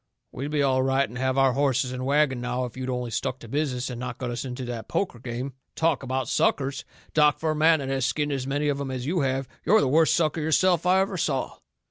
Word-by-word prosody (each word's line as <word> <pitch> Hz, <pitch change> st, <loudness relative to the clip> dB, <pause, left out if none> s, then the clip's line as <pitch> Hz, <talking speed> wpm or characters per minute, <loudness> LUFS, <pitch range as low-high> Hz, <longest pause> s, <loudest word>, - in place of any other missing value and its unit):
"We'd 140 Hz, +3 st, -5 dB
be 150 Hz, -1 st, +1 dB
all 130 Hz, -1 st, +2 dB
right 135 Hz, +1 st, +2 dB
and 115 Hz, -, -12 dB
have 130 Hz, 0 st, 0 dB
our 135 Hz, -1 st, +4 dB
horses 130 Hz, -2 st, +1 dB
and 130 Hz, 0 st, -4 dB
wagon 140 Hz, -3 st, +2 dB
now 125 Hz, +1 st, -2 dB
if 120 Hz, -, -9 dB
you'd 130 Hz, 0 st, -4 dB
only 125 Hz, -2 st, -3 dB
stuck 125 Hz, +3 st, -2 dB
to 115 Hz, -, -10 dB
business 130 Hz, -1 st, -1 dB
and 120 Hz, -, -6 dB
not 125 Hz, -1 st, -5 dB
got 125 Hz, -2 st, -4 dB
us 120 Hz, -, -3 dB
into 130 Hz, -1 st, -5 dB
that 120 Hz, -2 st, -5 dB
poker 175 Hz, -11 st, -2 dB
game. 125 Hz, +3 st, -5 dB, 0.2 s
Talk 160 Hz, -2 st, +1 dB
about 130 Hz, -1 st, -2 dB
suckers! 135 Hz, +2 st, 0 dB, 0.3 s
Doc, 150 Hz, -1 st, +4 dB
for 160 Hz, -1 st, -1 dB
a -, -, -1 dB
man 160 Hz, +1 st, +5 dB
that 135 Hz, -, -4 dB
has 135 Hz, -1 st, -1 dB
skinned 145 Hz, +4 st, 0 dB
as 135 Hz, -2 st, -2 dB
many 145 Hz, +2 st, 0 dB
of 140 Hz, -1 st, 0 dB
'em 140 Hz, -, -3 dB
as 130 Hz, -1 st, -4 dB
you 170 Hz, +5 st, 0 dB
have, 135 Hz, -2 st, 0 dB, 0.2 s
you're 220 Hz, +3 st, +5 dB
the -, -, +2 dB
worst 160 Hz, +4 st, +4 dB
sucker 160 Hz, -1 st, +1 dB
yourself 175 Hz, +3 st, +2 dB
I 185 Hz, +1 st, +5 dB
ever 195 Hz, -1 st, -1 dB
saw." 140 Hz, -5 st, -2 dB
135 Hz, 250 wpm, -26 LUFS, 125-150 Hz, 0.3 s, man